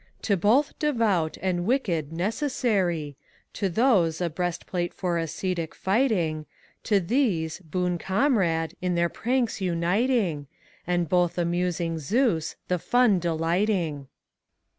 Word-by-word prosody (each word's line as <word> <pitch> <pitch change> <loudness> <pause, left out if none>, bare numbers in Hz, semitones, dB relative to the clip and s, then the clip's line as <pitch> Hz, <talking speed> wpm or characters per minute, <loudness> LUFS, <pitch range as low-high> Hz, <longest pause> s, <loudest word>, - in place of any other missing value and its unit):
"To 205 - +2
both 225 - +3
Devout 220 - +1
and 180 -2 0
Wicked 180 - 0
necessary: 185 - -1 0.4
To 200 -2 -1
those, 185 -7 +2
a 175 -2 -1
breast 175 +1 -3
plate 175 -1 -3
for 175 -3 -1
ascetic 165 +1 -3
fighting; 190 -7 +1 0.4
ACT - - -11
II. 205 - +6
87 - - +1
To - - -12
these, 185 - 0
boon 180 0 -2
eomrade, 190 - +1
in 180 -1 0
their 170 0 +2
pranks 240 -1 -1
uniting; 180 - 0 0.4
And 175 -1 +1
both 175 0 +2
amnsing 175 -1 -1
Zens, 165 - 0
the 180 - +1
fnn 240 -2 +3
delighting. 165 -2 0
180 Hz, 130 wpm, -26 LUFS, 165-215 Hz, 0.4 s, II